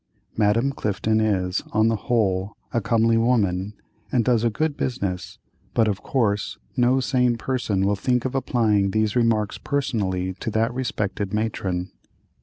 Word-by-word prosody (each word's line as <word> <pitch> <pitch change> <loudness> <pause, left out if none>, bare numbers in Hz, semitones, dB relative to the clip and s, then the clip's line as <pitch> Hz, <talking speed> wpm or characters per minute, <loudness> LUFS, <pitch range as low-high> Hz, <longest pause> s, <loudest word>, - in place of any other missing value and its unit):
Madame 115 +5 +2
Clifton 110 -2 0
is, 95 -4 0
on 110 +1 +4
the 115 - +2
whole, 100 -3 0 0.2
a 115 - +1
comely 115 +2 +3
woman, 105 -4 +1 0.4
and 120 -4 +2
does 120 -3 +3
a 120 - +3
good 150 +6 -1
business, 100 -10 -3 0.4
but 115 -2 +4
of 100 -3 -1
course 105 - 0 0.2
no 125 +2 +3
sane 125 -2 +1
person 115 -7 -1
will 100 +1 +2
think 125 +4 0
of 130 - -2
applying 110 -6 +2
these 110 +1 0
remarks 115 -4 +1
personally 95 -10 -1
to - - -3
that 115 +2 0
respected 105 -5 -2
matron. 95 -4 -2
110 Hz, 150 wpm, -23 LUFS, 100-120 Hz, 0.4 s, on